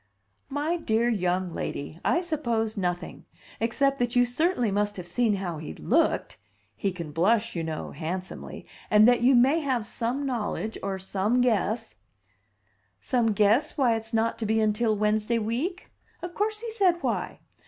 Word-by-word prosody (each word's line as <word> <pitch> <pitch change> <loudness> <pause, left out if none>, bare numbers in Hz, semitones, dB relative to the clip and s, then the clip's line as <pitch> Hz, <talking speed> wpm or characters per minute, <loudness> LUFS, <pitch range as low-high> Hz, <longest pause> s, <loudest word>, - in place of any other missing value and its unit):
"My 295 +5 -1
dear 230 -7 +1
young 180 -4 0
lady, 145 +3 -5
I 345 - +2
suppose 235 -10 -1
nothing, 180 -3 -3 0.3
except 275 +5 +1
that 245 0 0
you 245 0 +5
certainly 245 - +1
must 205 +1 0
have 180 - -6
seen 210 +5 +1
how 175 -5 -4
he 155 - -7
looked - - 0 0.4
(he 200 - -1
can 170 -4 -7
blush, 210 +8 +2
you 165 - -2
know, 160 -1 -4
handsomely), 180 +5 -6 0.2
and 215 +1 +6
that 245 -1 +4
you 255 +2 +5
may 265 +7 +5
have 260 -7 -1
some 240 +5 -2
knowledge 220 -3 -2
or 195 -1 -2
some 195 +5 0
guess 230 -2 +1 0.6
" - - -43 0.3
"Some 235 -5 +1
guess 215 +10 +2
why 250 -5 +3
it's 225 0 -5
not 225 0 0
to 220 - -2
be 220 +1 +2
until 215 +1 +2
Wednesday 215 +2 +1
week? 250 - -3 0.3
Of 350 0 -5
course 425 +2 -1
he 465 -1 -5
said 370 -6 +2
why. - - -2
225 Hz, 165 wpm, -27 LUFS, 200-255 Hz, 0.6 s, and